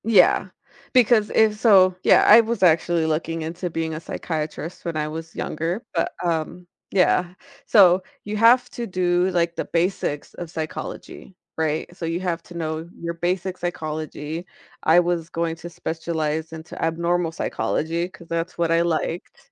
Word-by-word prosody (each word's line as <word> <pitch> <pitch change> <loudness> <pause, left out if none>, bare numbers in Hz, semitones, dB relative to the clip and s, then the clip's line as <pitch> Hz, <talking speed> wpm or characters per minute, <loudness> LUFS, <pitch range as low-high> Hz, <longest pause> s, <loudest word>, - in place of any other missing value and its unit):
Yeah, 200 -4 +4 0.5
because 235 -4 +4
if 215 -1 +3
so 190 -5 +6
yeah, - - +6
I 225 +3 +9
was 230 -2 -2
actually 170 -1 +3
looking 165 +1 -1
into 175 +3 -4
being 160 -1 -3
a 155 - -4
psychiatrist 160 0 -5
when 170 -2 -2
I 150 0 -1
was 160 +1 -7
younger, 170 +8 -3
but, 165 - 0
um 170 +1 -2 0.2
Yeah. 180 -1 +2 0.3
So 185 -3 +6 0.2
you 210 +1 -4
have 235 +3 +5
to 240 - -4
do 180 0 +1
like 170 -1 0
the - - -3
basics 165 -4 -1
of 175 - -7
psychology, 160 +3 -7 0.2
right? 160 -1 -1
So 175 - -5
you 165 +1 -1
have 175 -2 -2
to 175 - -10
know 160 0 -4
your 170 0 -3
basic 180 +2 -2
psychology. 155 -1 -4 0.4
I 165 +2 +6
was 175 -2 -1
going 165 -1 -2
to 175 - -8
specialize 160 -1 -3
into 160 0 -9
abnormal 170 +1 0
psychology, 165 +1 -2
'cause 185 -3 -15
that's 165 +1 -3
what 170 -1 +1
I 165 0 +4
liked. 170 0 -3
170 Hz, 160 wpm, -23 LUFS, 160-180 Hz, 0.5 s, I